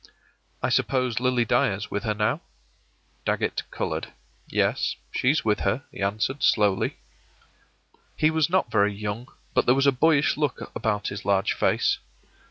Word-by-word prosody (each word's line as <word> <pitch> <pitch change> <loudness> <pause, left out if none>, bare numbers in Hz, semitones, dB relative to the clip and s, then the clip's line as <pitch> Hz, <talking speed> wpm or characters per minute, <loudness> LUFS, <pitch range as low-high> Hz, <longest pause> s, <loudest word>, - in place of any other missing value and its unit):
” - - -37
“I - - +2
suppose 125 -4 +1
Lily 125 -1 +2
Dyer's 105 -1 +1
with 100 +2 -3
her 105 -1 0
now?” 105 0 0 0.8
Dagget - - 0
colored. - - -3 0.4
“Yes, - - +1 0.2
she's 135 +2 +1
with 105 -1 +2
her,” 130 +5 0
he - - -9
answered, 110 +8 -1
slowly. 105 -3 +2 1.2
He 155 0 +3
was 160 -1 +2
not 180 -9 +1
very 100 -1 +2
young, 105 +4 -4 0.3
but - - +2
there 125 - +6
was 135 +1 +2
a 140 - +6
boyish 145 +2 +3
look 150 -4 -2
about 105 -2 -1
his 100 - -6
large 100 -1 +2
face. - - +1
115 Hz, 155 wpm, -25 LUFS, 105-135 Hz, 1.2 s, there